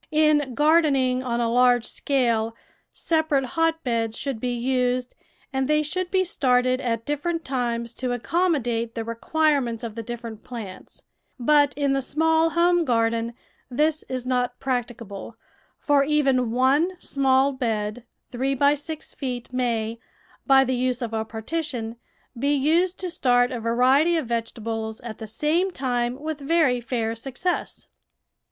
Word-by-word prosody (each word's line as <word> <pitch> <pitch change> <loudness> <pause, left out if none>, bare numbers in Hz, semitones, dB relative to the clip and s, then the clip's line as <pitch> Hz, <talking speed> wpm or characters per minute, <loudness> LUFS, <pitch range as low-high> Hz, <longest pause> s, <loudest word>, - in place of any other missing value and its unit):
In 305 -4 +2
gardening 290 -5 +3
on 240 -2 -2
a 235 - +1
large 245 -1 +4
scale, 230 -5 0 0.4
separate 315 -4 0
hotbeds 250 -9 0
should 270 -5 -3
be 250 +2 -2
used, 250 0 0 0.4
and 265 -1 0
they 305 +1 +2
should 365 +4 -3
be 375 0 +2
started 255 -7 +2
at 230 -2 -2
differ 295 +3 -2
ent 330 -1 -2
times 235 -3 -2
to 255 +1 -3
accommodate 245 -5 0
the 230 - -2
requirements 245 +1 0
of 230 -2 -4
the 230 - -5
different 230 -1 -7
plants; 220 -7 -9 0.4
but 290 +3 +3
in 280 -1 +1
the 275 - +1
small 320 +4 +2
home 345 +1 +3
garden 230 -2 0 0.3
this 300 +4 +1
is 255 -1 -3
not 250 -1 -1
practicable, 235 -4 -4 0.4
for 285 -2 +3
even 275 -4 +2
one 280 +10 +2
small 270 -2 +2
bed, 225 -3 -2 0.3
three 265 +2 -1
by 285 +2 +4
six 300 +2 -6
feet, 250 -3 -5
maj^ 235 -3 -1 0.5
by 270 -1 +7
the 260 0 -1
use 250 0 0
of 225 -1 -4
a 220 0 0
partition, 230 0 -4 0.4
be 280 +4 +1
used 335 +6 +2
to 365 - -2
start 245 -4 +2
a 245 - -3
variety 260 +9 +3
of 315 - -1
vegetables 225 -1 -3
at 230 -3 -8
the 220 - -6
same 310 - +1
time 250 -5 -2
with 310 0 -4
very 280 -4 +2
fair 230 -2 -2
success. 270 +10 -3
255 Hz, 145 wpm, -24 LUFS, 235-295 Hz, 0.5 s, by